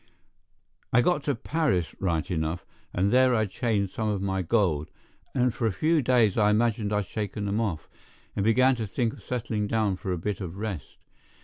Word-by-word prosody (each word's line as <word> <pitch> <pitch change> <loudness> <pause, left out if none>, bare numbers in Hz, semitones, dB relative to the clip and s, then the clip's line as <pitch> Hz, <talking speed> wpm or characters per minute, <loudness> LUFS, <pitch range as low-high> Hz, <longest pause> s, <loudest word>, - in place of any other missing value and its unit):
I 125 - +5
got 165 -1 +2
to 145 - +1
Paris 115 - 0
right 85 -4 -1
enough, 80 +1 -2 0.3
and 95 +4 +1
there 130 -1 +5
I 110 -1 +2
changed 100 -2 -1
some 110 -1 -1
of 105 -2 0
my 95 -1 -1
gold, 85 -6 +1 0.5
and 125 -2 +2
for 115 - 0
a - - +1
few 155 - +2
days 120 -5 +3
I 105 -1 +5
imagined 110 -1 +1
I'd 105 -1 +1
shaken 105 +1 -4
them 100 +3 0
off, 95 -9 -2 0.5
and 100 - 0
began 125 +5 +4
to 110 -2 -3
think 115 +3 -1
of - - -13
settling 110 -4 -2
down 105 -3 +1
for 95 - -4
a 90 - 0
bit 105 +4 -3
of 90 0 -6
rest. 100 -7 -5
105 Hz, 195 wpm, -27 LUFS, 95-120 Hz, 0.5 s, I